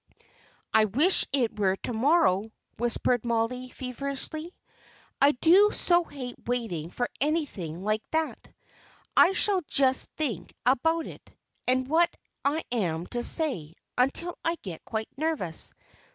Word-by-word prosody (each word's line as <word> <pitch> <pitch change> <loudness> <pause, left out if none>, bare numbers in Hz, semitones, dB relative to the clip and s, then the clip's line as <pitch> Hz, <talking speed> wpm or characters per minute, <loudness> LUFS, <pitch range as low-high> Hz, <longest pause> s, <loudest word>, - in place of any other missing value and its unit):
"I 220 0 +5
wish 290 - +3
it 245 -6 0
were 190 -2 +2
to 235 - -5
morrow," 225 - +3 0.3
whispered 240 0 +1
Mollie, 240 +2 -1
feverishly. 280 +6 -6 0.7
"I 285 +2 +6
do 360 +10 +5
so 350 0 +3
hate 255 -5 -7
waiting 225 -10 -2
for 245 +6 -2
anything 250 - -2
like 215 +1 0
that. 320 0 -2 0.6
I 370 - +6
shall 390 -1 +3
just 265 -1 +2
think 230 - -3
about 320 +6 +2
it, - - -12 0.3
and 255 0 +2
what 335 +4 +4 0.3
I 300 +3 +1
am 175 -8 -1
to 240 - -1
say, 225 - 0 0.2
until 275 +8 +1
I 330 +1 +1
get 175 -5 -7
quite 220 -1 -3
nervous. 290 - 0
255 Hz, 130 wpm, -27 LUFS, 220-315 Hz, 0.7 s, I